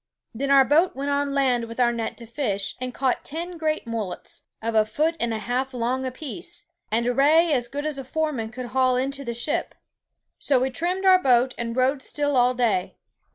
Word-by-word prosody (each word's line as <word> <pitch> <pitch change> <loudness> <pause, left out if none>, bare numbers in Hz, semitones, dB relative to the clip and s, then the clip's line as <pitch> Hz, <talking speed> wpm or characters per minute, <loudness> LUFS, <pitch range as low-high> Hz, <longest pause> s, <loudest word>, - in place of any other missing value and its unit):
Then 275 +5 -2
our 275 -1 +6
boat 320 +7 +3
went 280 +1 -2
on 285 0 0
land 255 -4 +2
with 230 +2 -9
our 240 -1 +3
net 230 -1 -4
to 235 - -9
fish, 220 -5 -2
and 255 0 -3
caught 260 0 0
ten 340 +4 -4
great 315 -1 -1
mullets, 225 -5 -5 0.2
of 230 +1 -2
a 220 -1 +5
foot 305 +10 0
and 235 -1 0
a 220 - -1
half 250 +5 -2
long 250 +2 -1
apeece, 340 +7 -5 0.3
and 230 +2 +1
a 245 - +1
ray 310 +5 +4
as 245 -3 +1
great 285 +4 -5
as 300 -3 -2
foure 310 +4 -1
men 225 -6 -4
could 250 +1 -7
hale 255 -1 +3
into 275 +2 -1
the 235 -3 -4
ship. 240 +5 -1 0.6
So 275 -3 +3
we 260 +1 0
trimmed 355 +7 -1
our 370 -1 +6
boat, 255 -2 +3
and 230 -1 -4
rode 265 +2 +2
still 290 +1 0
all 250 0 +4
day. 210 -7 0
260 Hz, 210 wpm, -24 LUFS, 235-290 Hz, 0.6 s, our